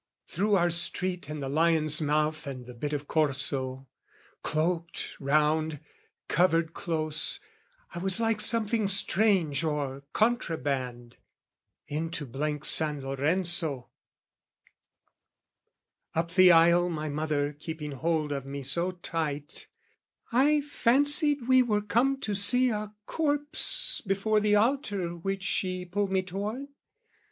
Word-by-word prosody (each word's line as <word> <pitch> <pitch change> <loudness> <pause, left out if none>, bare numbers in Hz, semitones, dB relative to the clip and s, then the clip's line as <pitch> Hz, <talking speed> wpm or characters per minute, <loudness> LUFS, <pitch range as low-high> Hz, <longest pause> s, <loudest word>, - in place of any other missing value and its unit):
through 205 +4 0
our 175 -2 +2
street 175 0 +1
and 150 -2 -6
the - - -4
Lion's 155 +1 +3
mouth 155 +1 -1
And 130 -3 -7
the 125 - -11
bit 145 +5 -5
of 145 -1 -4
Corso, 135 -3 -1 0.5
cloaked 165 +2 -3
round, 150 +2 0 0.5
covered 165 -1 +1
close, 155 -4 0 0.5
I - - -6
was 190 +2 +6
like 225 -2 0
something 220 -1 +3
strange 195 -7 +2
or 145 -3 -3
contraband, 135 - -2 0.7
Into 160 0 -3
blank 150 +4 -4
San 150 -3 +4
Lorenzo, 155 +1 -1 2.3
up 165 +1 -2
the 185 0 +6
aisle, 170 +1 +4
My 155 -2 -4
mother 150 -1 -2
keeping 150 0 -7
hold 155 +2 -2
of 140 -2 -4
me 140 +1 -7
so 170 +8 0
tight, 155 -4 -5 0.6
I 290 +5 +3
fancied 290 0 +2
we 260 0 +5
were 210 -4 0
come 255 +6 0
to 210 - -2
see 245 +6 +4
a 210 -1 -4
corpse 295 -1 0
Before 200 +3 +1
the 210 0 +2
altar 205 - -1
which 195 +3 -4
she 185 -2 -2
pulled 195 +2 -3
me 190 -1 0
toward. 210 +9 -6
170 Hz, 120 wpm, -27 LUFS, 150-205 Hz, 2.3 s, was